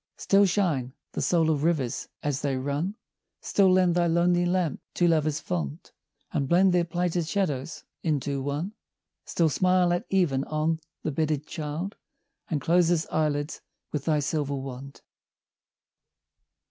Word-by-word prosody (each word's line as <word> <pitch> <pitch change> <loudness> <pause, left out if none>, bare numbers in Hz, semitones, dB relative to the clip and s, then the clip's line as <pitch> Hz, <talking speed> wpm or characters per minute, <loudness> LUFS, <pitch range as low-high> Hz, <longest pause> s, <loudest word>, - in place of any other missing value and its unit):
Still 200 0 +4
shine, 165 -10 0 0.2
the - - -3
soul 165 -2 +3
of 145 -2 0
rivers 155 -8 0 0.2
as 145 -2 -1
they 140 -2 0
run, 145 +9 -2 0.4
Still 195 -2 +3
lend 185 -1 +4
thy 175 0 +2
lonely 175 +1 +3
lamp 175 -5 0
to 175 - +3
lovers 155 -2 +2
fond, 75 -5 -4 0.4
And 140 -3 -1
blend 180 +2 +5
their 175 -1 +3
plighted 175 0 -1
shadows 165 -7 -2 0.2
into 145 -3 -1
one: 145 +9 -3 0.5
Still 170 - +2
smile 180 +2 +3
at 175 +6 -2
even 165 -9 +2
on 155 +1 0 0.2
the 155 - -1
bedded 150 0 -1
child, 160 +6 -5 0.5
And 155 - 0
close 170 +2 +3
his 170 -1 +2
eyelids 150 0 -1 0.3
with 145 -2 -3
thy 155 -2 +2
silver 145 -1 -1
wand! 135 0 -7
160 Hz, 145 wpm, -27 LUFS, 145-175 Hz, 0.5 s, blend